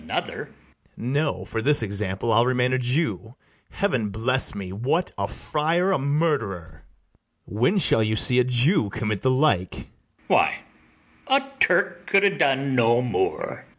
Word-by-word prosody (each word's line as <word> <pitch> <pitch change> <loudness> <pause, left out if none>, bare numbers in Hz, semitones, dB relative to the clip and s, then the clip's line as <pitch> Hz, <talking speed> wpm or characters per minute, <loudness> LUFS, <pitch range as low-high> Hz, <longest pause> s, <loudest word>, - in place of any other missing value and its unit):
BARABAS. - - -4 0.5
No; 135 -4 -2
for 115 +2 -4
this 145 0 +3
example 100 +1 -3
I'll 115 +3 +3
remain 125 0 +1
a 130 - +1
Jew: 125 -2 -2 0.3
Heaven 130 - -1
bless 115 +4 0
me! 95 -2 -6
what, 135 - -1
a 100 0 -3
friar 165 - -1
a 190 - +1
murderer! 140 - -2 0.6
When 120 - 0
shall 140 -11 +3
you 110 0 0
see 125 +3 +4
a - - +4
Jew 125 - +2
commit 105 0 -3
the 130 - +1
like? 130 - +1
ITHAMORE. - - -10 0.4
Why, - - +2 0.7
a 270 +1 +3 0.2
Turk 180 0 +1
could 195 0 +3
ha' 200 -1 +3
done 135 -3 +1
no 120 0 +3
more. 430 - -3
130 Hz, 150 wpm, -23 LUFS, 110-160 Hz, 0.7 s, see